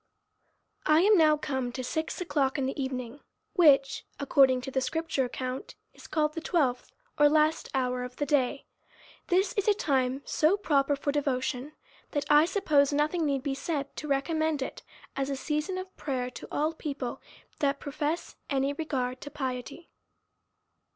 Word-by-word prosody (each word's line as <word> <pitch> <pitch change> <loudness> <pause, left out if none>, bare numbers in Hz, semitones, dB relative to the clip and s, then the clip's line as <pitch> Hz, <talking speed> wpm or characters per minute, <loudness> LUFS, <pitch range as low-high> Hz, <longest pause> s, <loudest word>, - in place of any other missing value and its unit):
I 310 +1 +6
AM 420 +3 +6
now 310 -4 +5
come 265 -4 -2
to 255 - -4
six 315 +5 -3
o'clock 290 -7 0
in 270 - 0
the 270 +1 -2
evening, 255 0 -5 0.3
which, 280 -8 +4 0.2
according 265 -2 +4
to 270 +1 -6
the 265 - 0
scripture 320 -2 -1
account, 255 +1 -5 0.2
is - - -14
called 305 -1 +1
the 325 - -4
twelfth, 280 -8 0 0.3
or 295 0 +7
last 310 +1 +2
hour 250 -1 0
of 250 0 -7
the 290 - -1
day. 275 -1 +1 0.6
This 380 +5 +2
is 405 -4 -1
a 420 - +5
time 270 -6 0
so 320 +6 +2
proper 285 -7 +2
for 285 +1 -1
devotion, 275 0 -1 0.4
that 290 -2 -1
1 300 +2 +7
suppose 305 -8 +3
nothing 305 +3 +1
need 275 -2 0
be 280 -2 -1
said 280 0 -3
to 300 - -5
re 275 -1 +1
commend 315 -2 0
it, - - -7 0.3
as 275 0 -1
a 275 - -1
season 300 +6 -2
of 370 0 -7
prayer, 255 -3 -2
to 235 - -9
all 310 +2 0
people 280 -6 -5 0.4
that 280 -1 +1
profess 300 +3 -3
any 275 0 +1
regard 260 -5 -3
to 290 - -7
piety. 270 +3 -5
285 Hz, 170 wpm, -29 LUFS, 265-310 Hz, 0.6 s, or